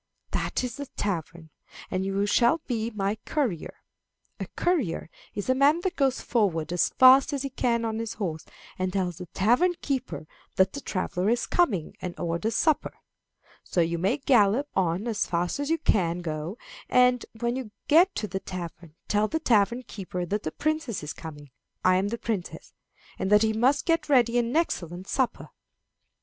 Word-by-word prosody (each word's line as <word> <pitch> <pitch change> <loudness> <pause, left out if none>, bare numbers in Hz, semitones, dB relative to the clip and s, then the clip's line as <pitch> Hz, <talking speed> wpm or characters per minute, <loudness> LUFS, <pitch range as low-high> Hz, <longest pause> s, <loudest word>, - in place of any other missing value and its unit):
That - - -1
is 245 -2 -4
the 285 -1 -6
tavern, 170 -6 -4 0.4
and 185 0 -1
you 195 +1 0
shall 240 +8 +3
be 230 -3 -2
my 210 -1 -2
courier. 245 - -2 0.6
A - - -4
courier 265 - 0 0.2
is 205 - -4
a 255 - +4
man 285 +5 +4
that 370 0 -2
goes 270 -2 +1
forward 175 - 0
as 175 - +2
fast 260 +2 +6
as 280 -1 -2
he 275 - -4
can 235 -2 0
on 220 0 -2
his 230 -1 -4
horse, 165 -7 -3 0.4
and 185 0 0
tells 180 -3 -2
the 180 - -7
tavern 245 - +2
keeper 255 - -3 0.3
that 190 0 +3
the 280 - -5
traveller 185 -2 -1
is 240 +1 +1
coming, 215 - +1
and 180 -1 -6
orders 175 +6 -1
supper. 315 +3 +1 0.7
So - - -2
you 170 0 +1
may 195 - +1
gallop 250 -1 +3
on 185 +4 0
as 220 -3 0
fast 175 +8 -1
as 285 +1 -2
you 325 - +2
can 175 - +1
go, 160 +5 -4 0.3
and, 250 -1 +4 0.2
when 235 +1 0
you 260 -4 -5 0.2
get 350 +6 +5
to 210 - -2
the 190 -1 -3
tavern, 170 -4 -8
tell 210 +1 +2
the 320 - -1
tavern 235 -2 +2
keeper 180 -5 -5
that 205 +4 -2
the 155 - -4
princess 310 - -2
is 150 - -5
coming 145 -3 -10 0.3
I 185 0 +5
am 190 +2 +1
the 235 +3 -3
princess 215 -6 -5 0.5
and 190 - -1
that 210 +1 +6
he 220 0 +2
must 255 +6 +2
get 330 -2 +1
ready 245 -3 +4
an 235 +2 -1
excellent 180 - -1
supper." 260 -2 -1
215 Hz, 180 wpm, -27 LUFS, 180-255 Hz, 0.7 s, fast